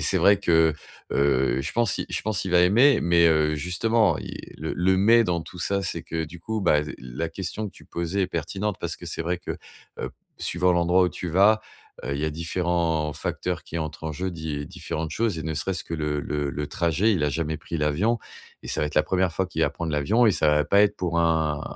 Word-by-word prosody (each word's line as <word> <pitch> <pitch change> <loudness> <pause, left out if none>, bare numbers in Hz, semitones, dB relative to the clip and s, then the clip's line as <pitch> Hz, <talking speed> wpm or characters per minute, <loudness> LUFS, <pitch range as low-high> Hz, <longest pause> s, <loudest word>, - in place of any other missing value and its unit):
c'est - - +1
vrai 100 -1 +5
que, 80 -5 +3 0.4
heu, 65 -2 +2
je - - -4
pense 120 -4 +1
il - - -2
je - - -1
pense 110 -2 -1
il 95 - -3
va 90 0 +5
aimer, 115 +9 +5
mais, 85 0 +4
heu, 75 -1 +2
justement 90 - +1
il - - -7 0.2
le 80 +2 -3
le 95 +1 +2
mais 115 +3 +5
dans 85 -3 0
tout 90 +2 -11
ça, 100 +3 0
c'est 85 - -3
que 80 0 -3
du 85 +3 -11
coup, 110 +4 -3
bah, 75 -6 +3
z - - -6
la 65 +6 -4
question 95 +4 -4
que - - -16
tu - - -17
posais 85 +3 -2
est 95 - +1
pertinente 95 +5 -3
parce - - -3
que - - -10
c'est - - -3
vrai 90 +1 -1
que, - - -5 0.5
heu, - - -4 0.3
suivant 90 +1 +1
l'endroit 90 +1 +3
où - - +2
tu 90 - -6
vas, 100 +6 +4 0.4
heu, 70 +2 -2
il 70 - -3
y - - 0
a - - -1
différents 85 -1 -1
facteurs - - -3
qui 85 - -5
entrent 80 -1 -5
en 80 - -2
jeu, 95 +5 -3
di 80 -3 -5
différentes 80 +2 -5
choses, 110 -5 -1
et 80 - -4
ne 80 0 -2
serait-ce 85 +3 -2
que 85 - -5
le 75 -2 -1
le 75 -1 -2
le 75 +3 -3
trajet, 85 +8 +1
il 85 - 0
a 75 - +1
jamais 80 0 -2
pris 85 - -5
l'avion, 85 +11 +1 0.4
et - - -9
ça - - -1
va 75 - +1
être - - -7
la 75 - +6
1re 95 -2 +1
fois 95 +3 -1
qu'il 80 -2 -2
va 70 - +2
prendre 80 +2 -4
l'avion 105 +12 +3
et 105 - +5
ça 80 - +2
va 75 0 +3
pas 100 +6 +4
être 105 0 +2
pour 85 -2 -1
un 80 -3 +1
85 Hz, 250 wpm, -25 LUFS, 75-95 Hz, 0.5 s, la